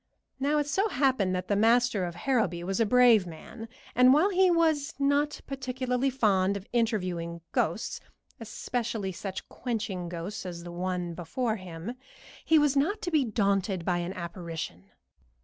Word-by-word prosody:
Now 285 +3 +1
it 295 - +1
so 390 +10 +1
happened 255 - +1
that 180 0 -3
the 205 - +1
master 225 -2 +3
of 175 -1 -6
Harrowby 215 -5 0
was 190 +3 -2
a 225 - +3
brave 235 -5 +5
man, 220 +7 -9 0.2
and 250 0 +6
while 365 +7 +4
he 375 0 +4
was 320 -3 +2
not 285 +1 +1
particularly 260 -1 -1
fond 200 -6 +2
of 195 - -10
interviewing 180 -8 -1
ghosts, - - -1 0.4
especially 230 -2 -3
such 190 +1 -6
quenching 205 -7 -4
ghosts 175 +4 -5
as 175 -2 -7
the 175 - -8
one 180 0 -3
before 220 - -2
him, 180 +3 -7 0.5
he 320 - +4
was 295 -2 +3
not 345 +10 +1
to 350 - -2
be 305 -3 +3
daunted 200 -5 0
by 175 -1 +1
an 175 +2 -3
apparition. 170 - -6
215 Hz, 160 wpm, -28 LUFS, 180-265 Hz, 0.5 s, and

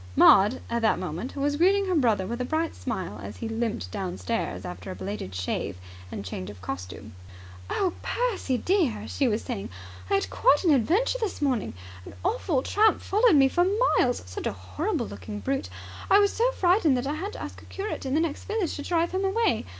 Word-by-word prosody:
Maud 205 +6 +6
at 235 0 -1
that 220 - +3
moment 180 - -5
was 290 +1 0
greeting 390 +4 +4
her 375 - 0
brother 230 - +2
with 235 +5 -4
a - - +1
bright 315 +5 -1
smile, 190 - -4
as 100 +1 -8
he 230 - -4
limped 225 - -2
downstairs 90 0 -3
after 90 0 -7
a 95 - -5
belated 95 0 -5
shave 90 0 -2 0.3
and 100 - -6
change 90 0 -5
of 105 -3 -10
costume. 90 +3 -7 0.6
"Oh, 370 -3 0
Percy, 445 - -1
dear," 310 - +1
she 275 - 0
was 220 -1 0
saying, 230 -7 -4 0.4
"I - - +3
had 195 - +1
quite 290 - +4
an 335 -5 +5
adventure 370 - +2
this 435 -5 -2
morning. 260 - 0 0.3
An - - -11
awful 365 - +1
tramp 430 +1 +3
followed 425 -2 +4
me 270 -2 +6
for 350 +6 +2 0.4
miles! 245 -1 +1
Such 90 0 -5
a - - -2
horrible 95 -1 -2
looking 100 +1 -7
brute. 100 -2 -2 0.4
I 395 - +7
was 405 -1 +4
so 480 +2 +2
frightened 350 - +3
that 245 - -2
I 285 - -1
had 385 +7 -4
to - - -8
ask - - -8
a - - -15
curate 405 +2 -5
in 265 0 -1
the 315 - +3
next 330 -3 -3
village 420 -5 -1
to - - -5
drive 335 +2 0
him 375 +1 -1
away. 390 - +1
255 Hz, 205 wpm, -26 LUFS, -, 0.6 s, I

